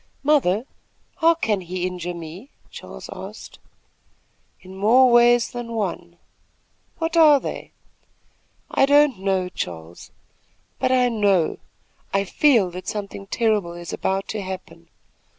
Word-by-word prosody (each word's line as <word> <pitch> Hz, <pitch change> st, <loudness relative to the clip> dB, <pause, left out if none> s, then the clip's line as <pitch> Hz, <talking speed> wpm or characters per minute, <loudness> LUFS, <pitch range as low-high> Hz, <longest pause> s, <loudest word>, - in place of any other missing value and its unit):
"Mother, 255 Hz, -8 st, +2 dB, 0.5 s
how 330 Hz, +1 st, +4 dB
can 215 Hz, -, -1 dB
he 180 Hz, 0 st, -4 dB
injure 180 Hz, -1 st, -4 dB
me?" 170 Hz, -, -9 dB, 0.2 s
Charles -, -, -10 dB
asked. -, -, -10 dB, 1.0 s
"In 185 Hz, 0 st, -12 dB
more 240 Hz, +6 st, +5 dB
ways 240 Hz, 0 st, +5 dB
than 240 Hz, -1 st, -6 dB
one." 175 Hz, -5 st, -4 dB, 0.8 s
"What 325 Hz, 0 st, -2 dB
are 305 Hz, -4 st, +7 dB
they?" -, -, -7 dB, 1.0 s
"I 270 Hz, -, +3 dB
don't 285 Hz, -6 st, +4 dB
know, 190 Hz, -1 st, 0 dB
Charles; 85 Hz, -, -7 dB, 0.7 s
but 255 Hz, -, +1 dB
I 250 Hz, -1 st, +4 dB
know 200 Hz, -7 st, +1 dB, 0.6 s
I 195 Hz, -, +2 dB
feel 220 Hz, -2 st, +3 dB
that 185 Hz, +1 st, -9 dB
something 200 Hz, -1 st, -6 dB
terrible 210 Hz, -6 st, 0 dB
is 175 Hz, 0 st, -8 dB
about 195 Hz, +1 st, -2 dB
to 215 Hz, -, -3 dB
happen. 170 Hz, -3 st, -9 dB
200 Hz, 125 wpm, -22 LUFS, 180-245 Hz, 1.0 s, are